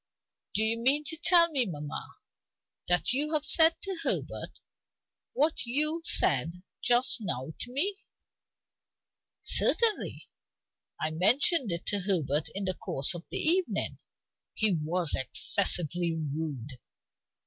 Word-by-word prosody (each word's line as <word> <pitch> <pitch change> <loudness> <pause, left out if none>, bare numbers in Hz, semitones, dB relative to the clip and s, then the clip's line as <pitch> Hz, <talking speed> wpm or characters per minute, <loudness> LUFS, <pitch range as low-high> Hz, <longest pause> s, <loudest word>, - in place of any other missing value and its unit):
"Do 215 - +2
you 225 +1 0
mean 275 +5 +3
to 310 +2 -1
tell 340 0 +4
me, 260 -6 +3
mamma, 150 -4 -8 0.7
that 175 +6 +1
you 300 +4 +1
have 300 -1 -1
said 320 +2 +5
to 380 -3 -3
Herbert - - -1 0.7
what 305 +3 0
you 305 +6 0
said 170 - +2 0.2
just 245 +1 +3
now 155 - -3
to 245 - -6
me?" 380 +10 0 1.5
"Certainly. 455 -3 +1 0.7
I 155 - -2
mentioned 235 - +2
it 170 0 -4
to 205 - +1
Herbert 160 -6 -1
in 200 0 -3
the 185 - -2
course 140 -2 0
of 175 0 -9
the - - -3
evening. 350 +3 0 0.6
He 215 -3 +1
was 165 +1 -1
excessively 170 +3 0
rude. 145 -5 -6
205 Hz, 125 wpm, -28 LUFS, -, 1.5 s, said